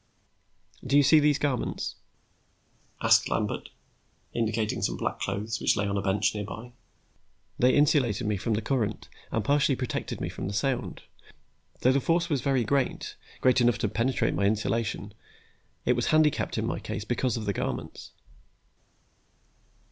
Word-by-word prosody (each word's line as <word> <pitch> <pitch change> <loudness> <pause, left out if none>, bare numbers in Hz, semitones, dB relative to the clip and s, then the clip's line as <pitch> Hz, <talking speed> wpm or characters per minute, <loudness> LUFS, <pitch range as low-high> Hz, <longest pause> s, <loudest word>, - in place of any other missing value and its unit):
"Do 135 +2 +2
you 145 - +6
see 150 +3 +6
these 145 -1 +3
garments?" 140 -5 -2 1.1
asked - - +5
Lambert, - - -2 0.6
indicating 110 -2 -1
some - - -1
black - - -2
clothes 110 +2 -3
which - - +2
lay 100 - +1
on 100 0 -1
a 100 - 0
bench 100 +1 +1
nearby. 105 +3 -6 0.9
"They 125 +1 +4
insulated 140 -8 +3
me 105 0 +1
from 110 +3 -1
the 110 - -2
current 110 -5 -1 0.2
and 110 -3 -1
partially 140 0 +3
protected 125 -1 -4
me - - -2
from - - -5
the 100 - -4
sound. 130 +1 -2 0.8
Though 130 - +5
the 135 +1 +2
force 170 +4 +1
was 140 -4 +1
very 135 -2 +1
great, 135 +3 -1 0.3
great 130 0 +4
enough 120 -2 +3
to - - 0
penetrate 115 +5 0
my 100 - 0
insulation, 110 +2 -1 0.7
it 125 - +4
was 120 - -1
handicapped 155 -2 +2
in - - 0
my - - -2
case 105 - -5
because 120 0 0
of 110 - -4
the 100 - 0
garments." - - -4
120 Hz, 155 wpm, -27 LUFS, 105-135 Hz, 1.1 s, you